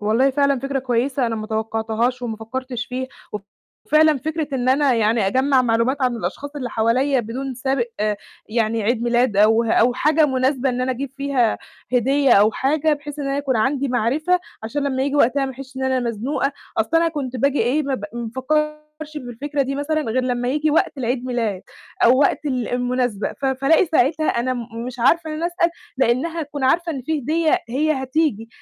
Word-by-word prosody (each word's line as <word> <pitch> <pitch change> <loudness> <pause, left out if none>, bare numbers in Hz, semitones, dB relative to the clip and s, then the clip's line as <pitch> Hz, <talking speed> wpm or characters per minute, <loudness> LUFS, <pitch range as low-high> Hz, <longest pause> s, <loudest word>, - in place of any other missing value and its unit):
والله 225 +6 +2
فعلًا 280 0 +2
فكرة 275 +1 -2
كويسة 255 +1 0
أنا 225 -1 -2
ما 215 0 -5
توقَّعتهاش 225 +3 -1
وما 225 -3 -3
فكَّرتش 245 +2 -5
فيها 260 +1 -4 0.2
وف 210 - -4 0.5
فعلًا 305 -1 +5
فكرة 315 +2 -3
إن 255 -1 -1
أنا 270 0 +3
يعني 220 -2 +2
أجمَّع 260 +4 +3
معلومات 240 +4 +1
عن 250 -2 +1
الأشخاص 255 +9 -5
اللي 255 -4 -4
حواليّا 250 +5 +2
بدون 255 +4 -5
سابق 260 0 0 0.6
يعني 225 0 0
عيد 230 +2 0
ميلاد 240 -2 +2
أو 220 +3 +5
أو 230 +2 +3
حاجة 305 +3 +3
مناسبة 265 0 +1
إن 250 -1 -1
أنا 255 +1 0
أجيب 265 +2 -5
فيها 275 -5 +1 0.3
هدية 265 +2 +3
أو 210 +1 +5
حاجة، 305 +5 +1
بحيث 295 0 -5
إن 280 -1 -3
أنا 275 - -1
يكون 275 -3 0
عندي 270 +4 +1
معرفة 280 +9 +1 0.2
عشان 275 +7 -3
لمّا 265 -2 0
ييجي 280 +1 0
وقتها 275 +1 +3
ما 265 - -4
أحسِّش 265 +1 -11
إن 265 - -3
أنا 260 -1 +1
مزنوقة. 245 +5 -1 0.3
أصلًا 330 +10 +2
أنا 335 - +3
كنت 275 -6 -4
باجي 280 +3 +1
إيه، 260 +7 +1
ما 275 -1 -1
ب 205 - -5
ما 235 -1 -5
بافكَّرش 305 +2 -2
بالفكرة 280 +2 -3
دي 270 +1 -3
مثلًا 310 +2 -1
غير 255 0 -1
لمّا 245 -1 -1
ييجي 300 +3 +1
وقت 295 -1 +1
العيد 250 0 -1
ميلاد 230 -7 -2 0.4
أو 250 +2 +6
وقت 290 +1 +2
ال 255 -5 -1
المناسبة، 245 -3 -1
ف 280 - -9
فألاقي 275 +7 +3
ساعتها 310 0 +2
أنا 240 +2 0
م 235 -1 -6
مش 250 -1 -7
عارفة 315 +7 +2
إن - - -4
أنا 325 +2 -1
أسأل 345 0 +1 0.3
لإنّها 265 +7 +1
هتكون 290 -2 -4
عارفة 335 +5 +2
إن 270 -4 -5
فيه 310 +3 -1
هدية 320 +6 +2
هي 295 +6 +1
هتيجي. 260 -5 0
260 Hz, 195 wpm, -21 LUFS, 240-290 Hz, 0.6 s, أو